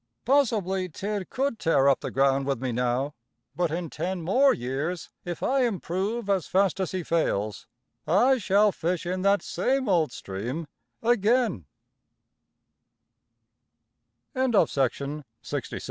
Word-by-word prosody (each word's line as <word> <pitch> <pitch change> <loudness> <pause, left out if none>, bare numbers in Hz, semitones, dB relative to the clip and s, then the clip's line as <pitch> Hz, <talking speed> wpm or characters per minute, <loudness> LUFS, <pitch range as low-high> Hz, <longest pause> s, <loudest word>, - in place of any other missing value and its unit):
Possibly 210 -9 +2
Tidd 200 +3 -4
could 265 -3 -1
tear 140 -4 +3
up 140 - +4
the - - -4
ground 135 0 +2
with 135 -4 0
me 130 0 -2
now, 125 +4 0 0.4
but 175 -1 +1
in 170 +2 -3
ten 185 +1 -3
more 260 +11 +4
years, 140 +8 -3
if 175 -2 -5
I 270 +1 +2
improve 205 +1 -2
as 195 -5 +1
fast 195 0 +2
as 190 - -1
he 185 -2 -3
fails, 105 - -1 0.4
I 245 - +4
shall 205 +1 +3
fish 175 0 -2
in 185 +1 -2
that 200 -1 +3
same 260 +8 0
old 170 -8 +2
stream 120 +11 -5 0.4
aga 235 +1 +2
185 Hz, 120 wpm, -26 LUFS, 145-210 Hz, 0.4 s, up